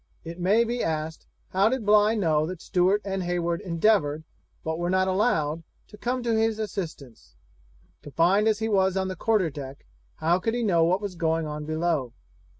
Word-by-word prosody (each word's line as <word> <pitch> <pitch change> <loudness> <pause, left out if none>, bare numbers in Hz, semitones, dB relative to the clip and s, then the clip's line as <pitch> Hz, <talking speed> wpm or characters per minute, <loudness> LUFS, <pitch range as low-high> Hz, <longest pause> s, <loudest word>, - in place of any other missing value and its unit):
It 170 +1 -8
may 200 +6 +3
be 240 +1 -2
asked, 160 0 -3 0.2
how 195 +3 +3
did 255 -3 -2
Bligh 210 +1 +4
know 155 -7 +1
that 185 -1 -6
Stewart 190 +4 +1
and 195 -1 -2
Heywood 175 -1 -1
endeavoured, 165 -4 +1 0.4
but 160 +1 -3
were 175 0 -1
not 185 0 +2
allowed, 185 -6 +1 0.3
to - - -12
come 245 +4 -2
to 230 -1 +1
his 220 0 +1
assistance? 170 - -6 0.7
Confined 175 +8 +2
as 215 -1 +3
he 220 +1 -2
was 190 -3 +2
on 190 0 -1
the 185 - -4
quarter 200 -4 +1
deck, 140 -1 -9 0.3
how 170 +3 +1
could 225 +4 -1
he 240 - -1
know 175 -6 +3
what 180 +4 +2
was 200 -2 -4
going 165 -1 0
on 150 0 -5
below? 155 -5 -1
185 Hz, 185 wpm, -26 LUFS, 160-210 Hz, 0.7 s, Bligh